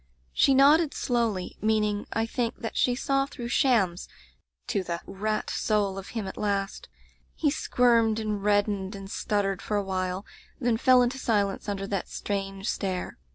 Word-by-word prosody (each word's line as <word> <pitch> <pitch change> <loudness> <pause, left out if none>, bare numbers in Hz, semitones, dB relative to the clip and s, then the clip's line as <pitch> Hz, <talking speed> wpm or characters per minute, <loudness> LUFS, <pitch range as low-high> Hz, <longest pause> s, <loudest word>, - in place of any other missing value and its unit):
"She 270 - +4
nodded 295 +3 +5
slowly; 230 -7 -1
meaning, 210 -1 +1
I 225 - 0
think, 230 0 -2
that 225 - -4
she 245 - +2
saw 275 +1 +1
through 240 -4 -7
shams 220 - +2 0.6
to 200 - 0
the 170 -1 -3
rat 215 +2 -2
soul 200 -3 0
of 195 - -9
him 215 - -2
at 190 - -7
last. 200 -1 -2 0.5
He 295 -3 +1
squirmed 230 -5 +2
and 210 -2 -2
reddened 205 -1 +1
and 195 0 -8
stuttered 195 -2 -1
for 210 - -1
awhile, 185 -1 -2 0.3
then 240 -3 +1
fell 255 +1 +5
into 250 +2 -1
silence 205 -4 0
under 195 -1 -2
that 195 -2 -3
strange 195 0 -4
stare. 185 - -3
210 Hz, 155 wpm, -27 LUFS, 195-240 Hz, 0.6 s, nodded